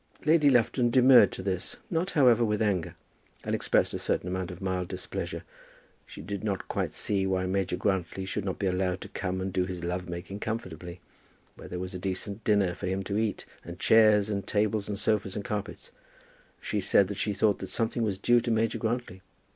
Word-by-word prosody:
Lady 150 -2 +5
Lufton 120 -1 +3
demurred 125 -3 +7
to 95 - -6
this, 95 -2 -3
not 170 +3 0
however 120 -4 +6
with 105 -2 0
anger, 100 -7 0 0.5
and - - -2
expressed - - +1
a - - -3
certain - - -1
amount 95 0 -3
of 90 -1 -8
mild 95 -2 -2
displeasure. - - -5 0.6
She - - -10
did 100 +4 -5
not 100 -4 -2
quite - - -2
see 100 -2 -1
why 95 -1 0
Major 95 -1 -1
Grantly 95 -1 -1
should 100 +1 -3
not 95 -2 -3
be 100 - -2
allowed 90 0 0
to - - -8
come 95 -1 -3
and 95 0 -3
do 90 - +1
his 90 -2 -6
love 90 +1 -3
making 90 +3 -6
comfortably, 90 -6 -5 0.5
where - - -11
there 90 - -5
was 90 +1 -5
a 90 - -5
decent 95 +3 -4
dinner 100 -4 +2
for 95 - -5
him 95 +1 -1
to 100 +2 -1
eat, 110 -2 -2 0.2
and 85 +1 -8
chairs 110 -1 +5
and 100 -2 -3
tables 105 0 0
and 100 - -2
sofas 105 -2 0
and 100 - -4
carpets. 105 -2 -5 0.7
She 105 - -2
said 95 +1 +4
that 100 0 -6
she 105 - 0
thought 105 0 +2
that 95 - -5
something 115 +3 -1
was 105 -4 0
due 120 +4 +3
to 120 - -3
Major 115 0 +1
Grantly. 115 -5 -3
100 Hz, 205 wpm, -28 LUFS, 95-110 Hz, 0.7 s, demurred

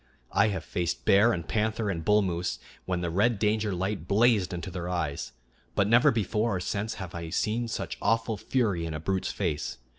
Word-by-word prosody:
I 100 - +4
have 100 -3 -2
faced 85 -1 -3
bear 100 +4 +6
and 85 -6 -3
panther 110 0 0
and 85 -3 -4
bull 105 +2 +4
moose 90 -1 -2 0.3
when 90 -1 -1
the 85 -1 -2
red 105 +6 +2
danger 105 0 +1
light 95 -1 -2
blazed 105 -2 +3
into 90 +1 -5
their 90 0 -4
eyes; 80 -6 -2 0.4
but 100 - +3
never 120 +6 +6
before 110 -2 0
or - - -1
since 105 +5 -2
have 95 -2 -7
I 85 -1 -5
seen 110 +7 0
such 115 - -4
awful 115 +1 +1
fury 100 -7 0
in 80 - -4
a - - -3
brute's 95 +4 -1
face. 80 -7 -2
100 Hz, 200 wpm, -28 LUFS, 90-110 Hz, 0.4 s, bear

